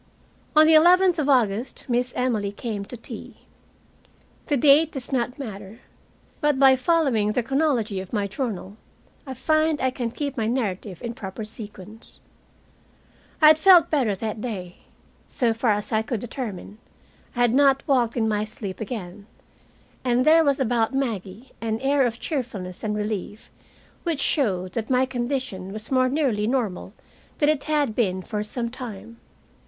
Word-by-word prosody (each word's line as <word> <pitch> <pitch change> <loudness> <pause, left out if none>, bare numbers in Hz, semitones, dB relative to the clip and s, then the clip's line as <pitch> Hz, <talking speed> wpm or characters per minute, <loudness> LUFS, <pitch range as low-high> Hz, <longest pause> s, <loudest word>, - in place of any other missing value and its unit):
On 310 0 +8
the 320 - +5
eleventh 355 +2 +5
of 290 -1 0
August 235 -3 +1
Miss 245 0 0
Emily 225 -6 0
came 205 -1 -5
to 245 - -9
tea. 230 - -10 1.1
The 290 - +1
date 295 +4 +5
does 270 -2 -7
not 250 0 -1
matter, 210 -5 -8 0.6
but 295 -2 +1
by 265 -1 +6
following 255 -7 +1
the 245 - 0
chronology 250 -6 0
of 185 -1 -8
my 205 -3 0
journal 205 -2 -5 0.5
I 265 - -5
find 310 +3 +1
I 260 0 +1
can 245 -2 -3
keep 280 +3 -4
my 220 -2 0
narrative 205 -6 -3
in 235 -1 -4
proper 215 -2 -7
sequence. 215 0 -11 1.2
I 305 - +10
had 310 0 +5
felt 360 0 +6
better 255 -10 +1
that 215 +2 -4
day. 185 -7 -6 0.5
So 235 -3 0
far 230 +1 0
as 210 0 0
I 220 -1 +2
could 235 0 -3
determine, 215 -3 -7 0.6
I 245 - -1
had 240 -1 +3
not 275 0 +4
walked 245 -4 +2
in 220 -2 +1
my 210 -1 0
sleep 210 -2 -7
again, 205 -3 -6 0.8
and 250 0 +2
there 320 +1 +6
was 280 -2 +1
about 240 -1 +1
Maggie 230 -2 -4
an 225 -1 -2
air 270 0 +2
of 230 0 -5
cheerfulness 225 - -5
and 210 -1 -1
relief 210 0 -4 0.5
which 330 -5 -2
showed 185 - 0
that 220 -1 -3
my 255 0 +3
condition 245 -7 -4
was 215 +4 -8
more 255 -1 +3
nearly 255 -8 0
normal 220 -8 -2 0.5
than 295 - +3
it 305 -3 0
had 295 -6 +1
been 190 -5 0
for 210 +1 -3
some 235 +2 -4
time. 230 -3 -8
240 Hz, 160 wpm, -24 LUFS, 210-270 Hz, 1.2 s, I